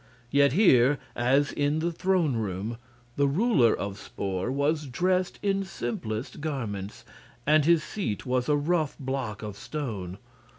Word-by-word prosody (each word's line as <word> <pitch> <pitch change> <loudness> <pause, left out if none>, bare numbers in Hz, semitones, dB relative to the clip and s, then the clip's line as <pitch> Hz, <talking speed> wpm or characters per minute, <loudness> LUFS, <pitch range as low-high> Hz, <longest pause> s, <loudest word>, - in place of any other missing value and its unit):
Yet 140 -1 +4
here, 145 - +5 0.2
as 135 +4 +2
in 145 +1 0
the 170 +2 0
throne 170 -5 +1
room, 105 +1 -3 0.4
the 140 0 +3
ruler 140 - +3
of 100 -1 -5
Spor 95 +3 -3
was 145 +2 0
dressed 180 +7 0
in 195 -1 +1
simplest 120 - -4
garments, 110 -10 -4 0.4
and 150 0 +4
his 165 -1 +4
seat 185 - -4
was 125 0 0
a 150 - +4
rough 155 0 0
block 130 -6 -4
of 105 -2 -5
stone. 100 - -5
140 Hz, 140 wpm, -27 LUFS, 115-155 Hz, 0.4 s, here